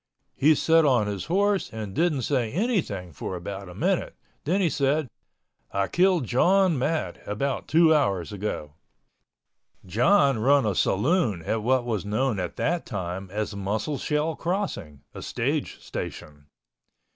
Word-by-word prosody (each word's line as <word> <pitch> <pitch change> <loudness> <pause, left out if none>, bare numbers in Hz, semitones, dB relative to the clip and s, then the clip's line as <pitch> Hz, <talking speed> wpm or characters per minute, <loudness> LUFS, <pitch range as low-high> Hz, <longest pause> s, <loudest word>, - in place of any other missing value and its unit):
He 155 +3 +4
set 165 +2 +4
on 125 -7 +3
his 100 -3 -4
horse 200 +3 +1
and 110 -3 -6
didn't 155 - +1
say 125 -5 0
anything 150 - -1
for 90 - -5
about 95 +2 -6
a 90 - -11
minute—then 180 +7 -2
he 190 - +3
said, 145 0 +1 0.6
"I 100 0 0
killed 180 -5 +3
John 180 - +3
Matt 140 - -1
about 130 +6 -2
two 160 0 +5
hours 100 - 0
ago." 95 -7 -4 1.1
John 135 - +3
run 140 +3 +4
a 105 - +1
saloon 105 - +1
at 110 +6 -1
what 125 +2 +1
was 110 -6 -2
known 110 +2 0
at 90 -2 -4
that 175 +1 -1
time 95 0 -5
as 105 +1 -3
Musselshell 145 +10 -2
Crossing, 170 - -3
a - - -8
stage - - -2
station. 75 -1 -7
125 Hz, 140 wpm, -25 LUFS, 100-160 Hz, 1.1 s, two